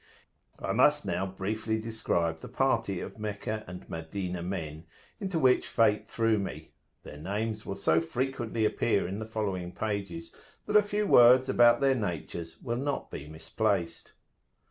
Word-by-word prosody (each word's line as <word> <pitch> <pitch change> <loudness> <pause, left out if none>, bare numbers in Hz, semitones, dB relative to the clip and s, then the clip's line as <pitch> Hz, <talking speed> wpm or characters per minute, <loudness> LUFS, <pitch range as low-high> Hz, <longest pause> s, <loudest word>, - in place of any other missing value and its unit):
I - - -3
must - - +4
now 95 - -1
briefly 110 +4 -2
describe 85 -7 -1
the - - -9
party 115 -8 0
of - - -8
Meccah 110 +1 -4
and 90 +1 -9
Madinah 90 +2 -4
men 85 -3 -5 0.3
into 190 -4 -2
which 130 -5 +3
fate 105 -2 +2
threw 115 -2 +2
me: 100 - -6 0.3
their 75 - -10
names 105 +5 -3
will 100 - -3
so 80 -3 +2
frequently 120 +2 -2
appear 105 -2 +1
in 95 +3 -4
the 110 - -5
following 100 -5 -3
pages, 100 -6 -4 0.3
that 210 - -3
a 210 - +9
few 210 0 -1
words 125 -5 +7
about 120 -1 +5
their 135 -1 +4
natures 85 - -4
will 120 -2 -2
not 140 +2 -3
be 70 - -7
misplaced. 85 +3 -2
105 Hz, 155 wpm, -29 LUFS, 90-120 Hz, 0.3 s, a